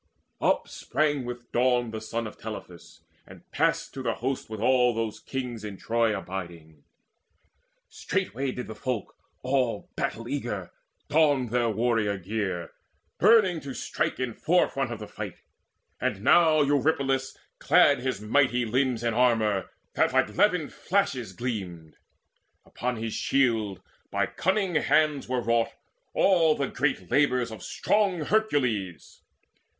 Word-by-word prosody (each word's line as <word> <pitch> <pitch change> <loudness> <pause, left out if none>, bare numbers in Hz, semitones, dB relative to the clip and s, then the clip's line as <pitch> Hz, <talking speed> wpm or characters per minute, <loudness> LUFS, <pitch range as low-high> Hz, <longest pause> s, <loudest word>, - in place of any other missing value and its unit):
Up - - +2
sprang 145 -3 -1
with 120 0 -7
dawn 120 -1 +2
the 110 -1 -5
son 115 +1 -3
of 110 - -7
Telephus, 85 -6 -9 0.3
And 95 -2 -14
passed 165 +2 0
to 135 - -6
the 115 -3 -1
host 130 0 -3
with 110 -1 -6
all 125 0 +3
those 115 -2 -3
other - - -27
kings 125 -4 -4
In 105 -2 -6
Troy 115 -1 +1
abiding. 85 -6 -8 1.0
Straightway 130 +7 -2
did 125 0 -5
the 110 - -7
folk 125 -3 -4 0.3
All 125 -4 0
battle - - -3
eager - - -4 0.4
don 145 -5 +3
their 120 0 +1
warrior 110 -2 +1
gear, 95 -3 -3 0.5
Burning 205 -7 +5
to 140 -3 -7
strike - - -2
in 130 -2 -2
forefront 135 -6 +1
of 115 - -4
the 105 - -7
fight. - - -8 0.6
And 100 0 -2
now 155 +1 +5
Eurypylus 140 -2 +1 0.2
clad - - +5
his 130 -4 -2
mighty 125 +2 +2
limbs 125 0 0
In 115 -1 +1
armour 110 -5 +2 0.2
that - - +2
like 105 - +2
levin 180 -8 +2
flashes 155 - -1
gleamed; 95 -8 -5 0.7
Upon 125 0 -3
his 115 -1 -4
shield 115 -8 +1 0.3
by - - +1
cunning 190 0 0
hands 150 -3 +2
were 130 -1 0
wrought 115 0 +1 0.4
All 165 -5 +4
the 140 -2 -2
great 130 -10 -1
labours 125 -5 +2
of 110 - -8
strong 200 -5 0
Hercules. 125 - -1
125 Hz, 140 wpm, -27 LUFS, 110-140 Hz, 1.0 s, Burning